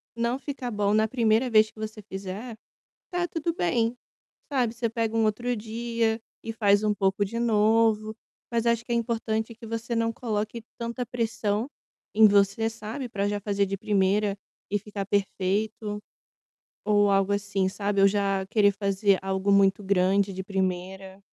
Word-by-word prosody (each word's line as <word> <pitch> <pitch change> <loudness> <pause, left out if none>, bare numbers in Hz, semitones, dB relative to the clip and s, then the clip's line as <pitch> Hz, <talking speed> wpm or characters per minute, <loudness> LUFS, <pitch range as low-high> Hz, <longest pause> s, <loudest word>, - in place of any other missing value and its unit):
não 235 +2 0
ficar 275 -3 -5
bom 205 -2 0
na 220 +1 +3
1ª 230 +1 +2
vez 215 -1 +5
que - - -17
você 215 0 -6
fizer, 200 +4 -6 0.5
tá 355 -1 -1
tudo 335 0 -2
bem, 225 - +1 0.6
sabe, 250 -5 +1
você 235 -1 -2
pega 225 0 -2
um 225 - +3
outro 240 +3 0
dia 230 +1 -1 0.2
e 225 - -4
faz 205 -2 +3
um 210 -1 +2
pouco 195 0 +1
de 230 +4 -4
novo, 220 -1 +3 0.4
mas 235 -1 0
acho 235 0 +2
que 240 - -6
é - - +2
importante 225 -1 -1
que 230 - -12
você 230 +1 -3
não 230 0 +1
coloque 220 -1 -3 0.2
tanta 235 +1 -3
pressão 225 -1 -1 0.5
em 220 0 +8
você, 200 +2 +3
sabe, 225 +4 -6
pra 200 -3 -1
já 205 0 -2
fazer 200 0 +1
de 195 0 -3
primeira 200 0 +1 0.4
e 205 - +1
ficar 205 -1 -5
perfeito, 205 +2 -1 0.8
ou 205 -1 +4
algo 195 0 +2
assim, 200 -1 0
sabe, 200 0 -1
ou 195 - +7
já 195 -1 0
querer 205 -1 +4
fazer 200 0 +1
algo 190 +1 0
muito 200 0 +4
grande 195 +1 +2
de 190 +1 -5
primeira. 190 0 -3
215 Hz, 165 wpm, -26 LUFS, 200-230 Hz, 0.8 s, em